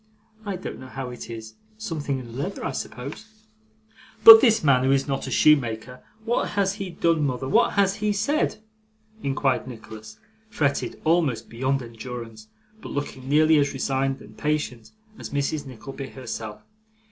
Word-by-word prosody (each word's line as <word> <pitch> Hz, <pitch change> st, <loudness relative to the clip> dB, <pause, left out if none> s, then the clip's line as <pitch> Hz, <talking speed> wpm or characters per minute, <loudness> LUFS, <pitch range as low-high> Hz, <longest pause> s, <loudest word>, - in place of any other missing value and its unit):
I 200 Hz, -, -2 dB
don't 185 Hz, -, -7 dB
know 130 Hz, -, -10 dB
how 130 Hz, -1 st, -6 dB
it 120 Hz, -, -9 dB
is 110 Hz, -1 st, -8 dB, 0.2 s
something 160 Hz, -10 st, -3 dB
in 130 Hz, -, -7 dB
the 115 Hz, -, -11 dB
leather, 135 Hz, +5 st, -4 dB
I -, -, -1 dB
suppose.' 140 Hz, -, -6 dB, 1.0 s
'But 225 Hz, 0 st, +12 dB
this 225 Hz, -6 st, +4 dB
man, 135 Hz, -4 st, +4 dB
who 135 Hz, -, +3 dB
is 135 Hz, 0 st, +2 dB
not 135 Hz, -1 st, -2 dB
a -, -, -3 dB
shoemaker 125 Hz, -4 st, +2 dB, 0.2 s
what 240 Hz, +1 st, 0 dB
has 195 Hz, -1 st, +2 dB
he 195 Hz, -2 st, -5 dB
done, 165 Hz, -2 st, +1 dB
mother, 130 Hz, -1 st, -2 dB
what 135 Hz, -, +3 dB
has 200 Hz, 0 st, +2 dB
he 210 Hz, 0 st, 0 dB
said?' 215 Hz, +2 st, 0 dB, 0.6 s
inquired 135 Hz, -3 st, 0 dB
Nicholas, 110 Hz, -2 st, -10 dB, 0.3 s
fretted 140 Hz, -9 st, -1 dB
almost 155 Hz, -7 st, +1 dB
beyond 130 Hz, +3 st, -1 dB
endurance, 115 Hz, -1 st, -8 dB, 0.3 s
but -, -, -8 dB
looking 135 Hz, -2 st, -5 dB
nearly 155 Hz, +1 st, +5 dB
as 145 Hz, 0 st, +1 dB
resigned 135 Hz, 0 st, -1 dB
and -, -, -14 dB
patient 150 Hz, -7 st, -2 dB, 0.3 s
as -, -, -7 dB
Mrs. 145 Hz, +1 st, -2 dB
Nickleby 135 Hz, +2 st, -8 dB
herself. 115 Hz, -4 st, -7 dB
135 Hz, 160 wpm, -24 LUFS, 125-160 Hz, 1.0 s, But